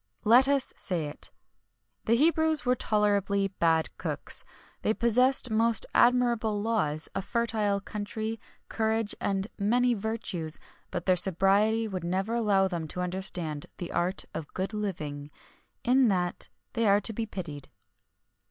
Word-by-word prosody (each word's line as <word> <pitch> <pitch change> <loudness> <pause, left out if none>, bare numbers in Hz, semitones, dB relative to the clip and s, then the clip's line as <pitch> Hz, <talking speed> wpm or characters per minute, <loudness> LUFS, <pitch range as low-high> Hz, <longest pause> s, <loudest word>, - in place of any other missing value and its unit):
Let 245 +5 +6
us 280 -1 +1
say 175 -5 -1
it: 145 - -6 0.7
the 230 - +3
Hebrews 315 0 +3
were 250 - +4
tolerably 200 -3 +1
bad 165 -4 +1
cooks. - - -3 0.4
They 220 - +1
possessed 250 +2 +3
most 225 0 +3
admirable 235 -3 +3
laws, 195 -9 -1
a - - -2
fertile 215 -2 0
country, 215 +2 -5 0.3
courage 220 -1 0
and 195 0 -1
many 245 +4 +2
virtues, 200 -7 -4 0.3
but - - -4
their 185 - +4
sobriety 195 +5 +3
never 190 +2 -2
would 235 - +1
allow 200 -4 +3
them 170 -4 -4
to 180 - -4
understand 180 -4 -1
the 175 - -6
art 180 +3 -1
of 150 - -6
good 190 +3 -3
living. 150 -9 -4 0.5
In 255 +1 +4
that, 180 -4 -1 0.2
they 230 -1 +1
are 200 0 +5
to 225 - -1
be 225 +1 -3
pitied. 155 -9 -7
205 Hz, 140 wpm, -28 LUFS, 185-230 Hz, 0.7 s, Let